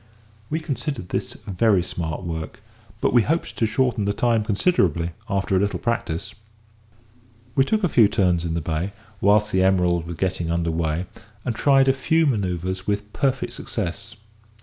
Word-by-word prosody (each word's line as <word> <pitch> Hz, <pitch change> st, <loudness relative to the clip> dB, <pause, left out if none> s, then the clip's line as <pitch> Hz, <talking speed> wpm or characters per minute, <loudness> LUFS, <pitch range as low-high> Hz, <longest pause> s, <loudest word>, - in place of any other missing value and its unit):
We 160 Hz, -, -1 dB
considered 140 Hz, -, -4 dB
this -, -, -3 dB
very 100 Hz, -1 st, +2 dB
smart 85 Hz, -2 st, -4 dB
work, 80 Hz, +3 st, -5 dB, 0.4 s
but -, -, +2 dB
we 120 Hz, -, +6 dB
hoped 160 Hz, +9 st, -1 dB
to 115 Hz, -, +1 dB
shorten 120 Hz, -3 st, +1 dB
the 100 Hz, -, +1 dB
time 115 Hz, -1 st, +2 dB
considerably 95 Hz, -, +1 dB, 0.2 s
after 95 Hz, -1 st, 0 dB
a -, -, +4 dB
little 100 Hz, +1 st, 0 dB
practice. 115 Hz, -9 st, -2 dB, 1.2 s
We 135 Hz, -, +3 dB
took 215 Hz, +6 st, 0 dB
a -, -, +4 dB
few 120 Hz, -9 st, +5 dB
turns 90 Hz, -4 st, +1 dB
in 85 Hz, -1 st, -2 dB
the 85 Hz, -, -1 dB
bay, 80 Hz, +5 st, -2 dB, 0.3 s
whilst 105 Hz, +2 st, +4 dB
the 95 Hz, -, +2 dB
Emerald 90 Hz, -3 st, +2 dB
was 85 Hz, -, -5 dB
getting 90 Hz, -2 st, -1 dB
under 85 Hz, 0 st, 0 dB
weigh, 80 Hz, +1 st, -1 dB, 0.4 s
and 125 Hz, -, 0 dB
tried 135 Hz, +2 st, +4 dB
a 135 Hz, -, +5 dB
few 160 Hz, +5 st, +2 dB
manoeuvres 95 Hz, -, -1 dB
with 105 Hz, 0 st, -2 dB
perfect 135 Hz, -2 st, 0 dB
success. 105 Hz, +3 st, -5 dB
100 Hz, 170 wpm, -23 LUFS, 85-120 Hz, 1.2 s, we